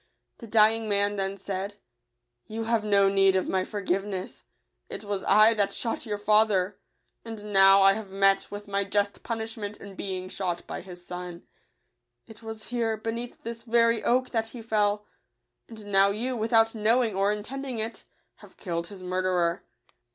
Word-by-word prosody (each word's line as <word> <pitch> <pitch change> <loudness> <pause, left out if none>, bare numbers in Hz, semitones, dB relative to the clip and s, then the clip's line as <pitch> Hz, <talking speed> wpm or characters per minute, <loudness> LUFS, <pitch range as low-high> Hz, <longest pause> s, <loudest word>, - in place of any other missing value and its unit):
The 230 - -10
dying 220 0 +3
man 205 0 +1
then 195 0 -2
said, 195 +1 -5 0.4
" - - -54 0.3
You 225 +1 -4
have 225 -1 +1
no 200 -2 +4
need 195 -1 +4
of 185 - +1
my 190 -1 0
forgiveness: 195 -1 -3 0.5
it - - -6
was 200 -2 -3
I 215 +3 +6
that 200 -2 +1
shot 230 0 -3
your 210 -1 -2
fa 210 +1 +5
ther; 195 -1 -1 0.4
and 210 -2 -8
now 195 0 +7
I 195 0 +7
have 215 -1 -6
met 195 0 +3
with 205 0 -8
my 200 0 0
just 200 +1 -1
pun 230 - -3
ishment 220 -2 -6
in 200 0 -11
being 185 -1 -5
shot 180 -2 -3
by - - -6
his 180 -1 -12
son. 180 -1 -7 0.8
It 220 -1 -14
was 220 -1 -8
here, 230 -2 -1
beneath 230 +2 -5
this 230 0 -6
very 230 -1 +2
oak, 255 +1 +1
that 225 -2 0
he 230 0 -10
fell; 210 -1 +1 0.6
and 220 -2 -11
now 195 -1 +4
you, 240 +6 -2
without 225 0 +3
knowing 225 +1 +2
or 195 +2 +2
intending 250 +5 -5
it, 220 +1 -4 0.3
have - - -17
killed 170 -2 -3
his 190 -1 -11
murderer. 180 -1 0
205 Hz, 175 wpm, -27 LUFS, 195-225 Hz, 0.8 s, now